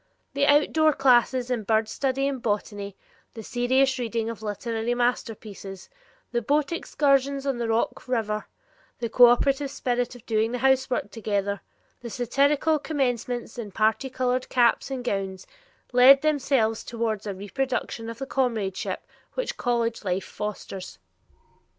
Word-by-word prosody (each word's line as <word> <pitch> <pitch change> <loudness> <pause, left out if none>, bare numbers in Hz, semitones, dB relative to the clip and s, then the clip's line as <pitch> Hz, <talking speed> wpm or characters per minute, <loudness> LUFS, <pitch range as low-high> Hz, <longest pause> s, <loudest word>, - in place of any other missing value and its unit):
The 280 +1 +2
outdoor 305 +1 +4
classes 255 -1 +3
in 240 -3 0
bird 220 +1 +1
study 270 +3 -1
and 270 -3 -3
botany, 205 -2 -3 0.4
the 225 - -7
serious 260 +3 +1
reading 230 -1 -2
of 225 - -10
literary 225 +2 -2
masterpieces, 215 -5 -3 0.4
the 240 -1 0
boat 290 +5 +1
excursions 275 -4 +1
on 270 -3 -1
the 235 - -1
Rock 225 +3 -1
River, 215 -4 -1 0.5
the 235 - -3
cooperative 260 +4 +5
spirit 245 -1 -2
of 245 -1 -14
doing 225 +1 0
the - - 0
housework 260 -4 +1
together, 200 -3 -2 0.4
the 240 - -7
satirical 280 +7 +2
commencements 245 -5 -2
in 210 -4 -6
parti 220 +6 +1
colored 255 0 -1
caps 240 0 +3
and 265 -2 -4
gowns, 195 -4 -3 0.5
lent 265 +3 +8
themselves 270 -7 +1
toward 225 -3 -3
a 200 - -3
reproduction 230 +2 -3
of 230 - -7
the 270 - -4
comradeship 230 -8 -2 0.3
which - - -2
college 235 -2 -1
life 185 -1 -1
fosters. 200 -2 -6
240 Hz, 140 wpm, -25 LUFS, 220-265 Hz, 0.5 s, lent